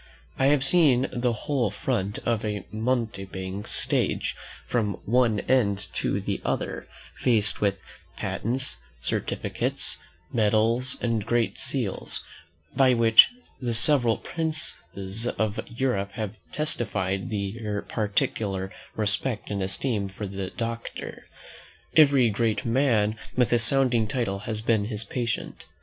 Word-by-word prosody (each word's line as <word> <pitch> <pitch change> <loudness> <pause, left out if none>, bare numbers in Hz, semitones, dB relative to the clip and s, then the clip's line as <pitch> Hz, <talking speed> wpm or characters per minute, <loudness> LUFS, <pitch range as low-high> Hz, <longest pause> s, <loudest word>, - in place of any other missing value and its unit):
I 135 - +4
have 145 -1 +4
seen 135 -4 +4
the 120 0 +1
whole 130 -7 +1
front 100 0 -2
of 115 -2 0
a 105 -3 -3
mountebank's 105 -4 -3
stage - - 0 0.3
from 105 -5 0
one 115 -2 +3
end 100 -7 +1
to - - 0
the - - -3
other, - - -2 0.3
faced 105 -5 +3
with 100 -1 +2 0.4
patents, 130 +4 -1 0.2
certificates, - - -1 0.3
medals, 115 +3 +2
and 115 -3 +1
great 120 +1 0
seals, - - 0 0.5
by 130 -2 +5
which 115 -1 +7 0.3
the 120 -2 0
several 120 -2 +4
princes 120 - -4
of 110 -1 0
Europe 115 -5 -1
have 105 -1 -4 0.2
testified 105 -10 0
their 105 0 -3
particular 100 -2 -1 0.2
respect 110 +2 0
and 100 -1 -1
esteem 100 +2 -1
for 100 +2 -6
the 95 -1 -4
doctor. 115 +2 -6 0.7
Every 140 -7 +6
great 110 +4 0
man 115 -4 +2 0.2
with 125 -1 +3
a 120 - +4
sounding 120 -1 +4
title 105 -5 -1
has 110 -1 -2
been 110 -3 +2
his 110 0 -2
patient. 120 -4 -3
115 Hz, 120 wpm, -26 LUFS, 100-125 Hz, 0.7 s, which